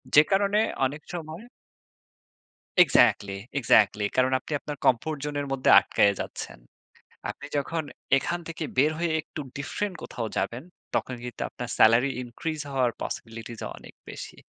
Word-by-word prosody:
যে 150 - +10
কারণে 200 +2 +3 0.3
অনেক 150 +3 -3
সময় 165 +5 -6 1.4
এক্সাক্টলি, 100 - +4 0.3
এক্সাক্টলি। 105 -3 +4
কারণ 130 0 +3
আপনি - - -12
আপনার 150 -2 -6
কমফোর্ট 140 +5 +2
জোনের 145 -1 -2
মধ্যে 135 -1 +1
আটকায়ে 100 0 +3
যাচ্ছেন। - - -7 0.7
আপনি 140 - -7
যখন 160 +3 -1 0.3
এখান 175 - -2
থেকে 165 -1 -5
বের 150 +4 +5
হয়ে 170 0 0
একটু 155 - -9 0.2
ডিফ্রেন্ট 175 +7 -3
কোথাও 115 -2 -4
যাবেন 125 +5 -2 0.3
তখন 130 - -1
কিন্তু 125 - -7
আপনার 120 -1 -7
সেলারি 115 +5 +6
increase 150 +6 -4
হওয়ার 130 -3 +2
পসিবিলিটিস 115 0 -6 0.2
অনেক - - -13 0.2
বেশি। - - -8
140 Hz, 135 wpm, -27 LUFS, 120-160 Hz, 1.4 s, যে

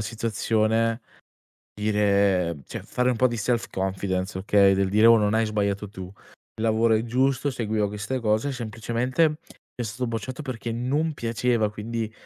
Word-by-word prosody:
situazione, 110 +1 0 0.7
dire 100 -5 +1
cioè - - -7
fare 125 0 0
un - - 0
po' 130 +2 +3
di 120 - -4
self 115 +2 -1
confidence, 95 0 -2
okay. 100 0 +4
Del 95 0 +1
dire: 105 +3 +4
"Oh, 115 - +8
non 105 -1 +1
hai 110 0 +2
sbagliato 100 -1 -1
tu, 95 -2 -8
il 100 +3 -18
lavoro 115 0 +3
è 110 +1 +1
giusto, 130 +3 +1
seguiva 110 -3 -1
queste 105 +5 -3
cose, 110 +4 0
semplicemente 120 +5 0
mi 150 - -5 0.4
è 120 - -3
stato 115 +3 -3
bocciato 115 +6 -5
perché 120 -4 -5
non 140 +7 -1
piaceva, 115 -3 0
quindi 110 +1 -4
110 Hz, 160 wpm, -25 LUFS, 105-120 Hz, 0.7 s, Oh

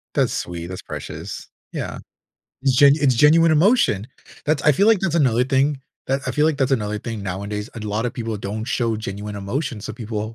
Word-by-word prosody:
That's - - +2
sweet, 85 0 -4
that's 95 0 -7
precious. - - -7 0.2
Yeah, - - -5 0.6
it's 135 -2 +3
gen 140 +1 +7
it's 140 -4 +3
genuine 160 +5 +5
emotion! 155 - +3 0.4
That's 150 -1 +1
I 150 - +5
feel 200 +9 +3
like 220 -3 +5
that's 170 -4 -1
another 125 -6 +3
thing, 135 +1 +1 0.3
that 135 +1 0
I - - -1
feel 150 - +2
like 155 -3 +1
that's 135 -1 +1
another 105 -4 0
thing 115 -2 -5
nowadays, 100 +3 -4
and 110 -2 -6
lotta 110 +3 -1
people 115 -3 -4
don't 105 +2 -4
show 115 -2 0
genuine 105 -1 -6
emotion, 115 +4 -3
so 110 - -6
people 110 0 -5
120 Hz, 195 wpm, -22 LUFS, 105-145 Hz, 0.6 s, gen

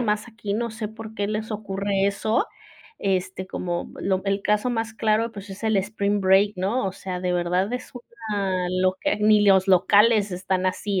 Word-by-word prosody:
más 215 0 -1
aquí, 215 -3 -4
no 235 +1 -1
sé 220 -1 -5
por 220 0 -10
qué 205 -2 -1
les 215 +2 -3
ocurre 200 -2 -1
eso, 215 +3 0 0.5
este, 185 -1 -1
como 175 -1 -3
lo 190 -1 0
el 195 0 0
caso 210 +5 +1
más 225 -1 -2
claro, 225 +1 +1
pues, 200 -1 -9
es 195 +4 -8
el 220 -1 +2
spring 200 +1 0
break, 195 +2 +4
¿no? 195 +4 0
O 190 - -2
sea, 185 -1 -5
de 180 0 -1
verdad 180 +5 0
es 250 0 -5 0.4
una 190 -3 0
loca, 185 +2 +1
ni 210 0 +4
los 190 -1 +5
locales 205 +3 +4
están 185 +1 -1
así, 195 +1 -1
200 Hz, 185 wpm, -24 LUFS, 190-215 Hz, 0.5 s, los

